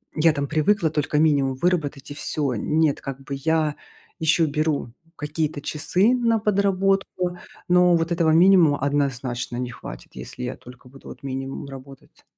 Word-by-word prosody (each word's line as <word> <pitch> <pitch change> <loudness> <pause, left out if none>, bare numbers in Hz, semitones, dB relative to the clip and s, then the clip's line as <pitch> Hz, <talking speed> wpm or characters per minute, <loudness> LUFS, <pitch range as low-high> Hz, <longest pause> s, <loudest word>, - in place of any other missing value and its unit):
я 160 +1 +4
там 140 -1 -2
привыкла 160 +4 +2
только 150 -1 -1
минимум 140 -4 +2
выработать 150 -3 -1
и - - -4
всё. 145 -2 -2
Нет, 155 +6 +1
как 135 -1 -6
бы 140 +1 -5
я 155 +1 0 0.4
ещё 160 +1 +3
беру 150 -4 -1 0.2
какие-то 150 0 -3
часы 180 - +1
на 230 -2 +2
подработку, 195 -3 0 0.3
но 180 0 +5
вот 165 0 0
этого 165 -2 +2
минимума 170 -3 +5
однозначно 130 -4 -1
не 125 0 -3
хватит, - - -10
если - - -7
я - - -3
только 125 0 -15
буду 135 +1 -15
вот - - -11
минимум 135 +1 -5
работать. 135 0 -13
150 Hz, 155 wpm, -23 LUFS, 135-175 Hz, 0.4 s, но